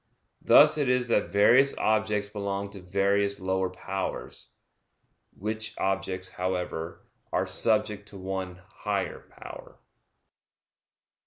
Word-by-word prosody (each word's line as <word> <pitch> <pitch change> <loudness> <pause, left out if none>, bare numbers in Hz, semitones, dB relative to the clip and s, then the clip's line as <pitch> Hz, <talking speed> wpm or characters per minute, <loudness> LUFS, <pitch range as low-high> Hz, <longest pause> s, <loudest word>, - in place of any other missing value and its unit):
Thus 150 +1 +6
it 140 -3 +1
is 125 -1 +1
that 105 - +1
various 125 +7 +5
objects 110 -1 +1
belong 100 -1 -4
to 100 -1 -10
various 100 +2 +1
lower 95 0 0
powers; 95 +1 -5 0.9
which 110 +2 -3
objects, 95 -1 -1
however, 90 -2 -4 0.3
are - - +1
subject 105 -2 0
to 100 - -11
one 95 -1 -5
higher - - -3 0.2
power. - - -10
100 Hz, 105 wpm, -27 LUFS, 95-110 Hz, 0.9 s, Thus